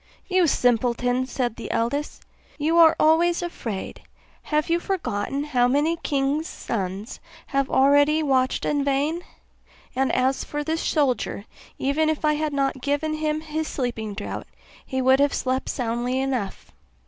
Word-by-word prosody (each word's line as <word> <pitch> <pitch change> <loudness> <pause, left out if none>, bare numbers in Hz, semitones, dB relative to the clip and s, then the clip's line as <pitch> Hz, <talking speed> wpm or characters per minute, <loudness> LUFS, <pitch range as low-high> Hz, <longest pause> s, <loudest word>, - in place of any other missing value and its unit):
'You 370 -3 +3
simpleton,' 245 0 +1
said 245 -3 -2
the - - -6
eldest, 260 +6 -2 0.3
'you 320 +3 +2
are 320 -1 +7
always 340 +3 +3
afraid; 230 - -5 0.4
have 305 0 0
you 335 +1 +2
forgotten 280 - -2
how 250 -5 +2
many 295 +6 +2
kings' 290 +1 -1
sons 195 +1 -4 0.3
have 275 -1 -1
already 285 +3 +4
watched 260 -2 +1
in 290 -1 +1
vain? 285 +5 0 0.7
And 265 +1 +1
as 260 +1 +1
for 295 0 -4
this 320 +2 -1
soldier, 260 -8 0 0.3
even 300 +4 +1
if 310 0 -1
I 300 - +4
had 305 0 -1
not 275 -2 -1
given 290 +3 -1
him 310 0 -1
his 315 0 -3
sleeping 225 -5 -3
draught, 205 - -5 0.4
he 260 0 -2
would 260 +1 +5
have 285 0 +3
slept 260 +1 -1
soundly 245 +1 -1
enough. 255 -7 -3
275 Hz, 150 wpm, -24 LUFS, 250-310 Hz, 0.7 s, are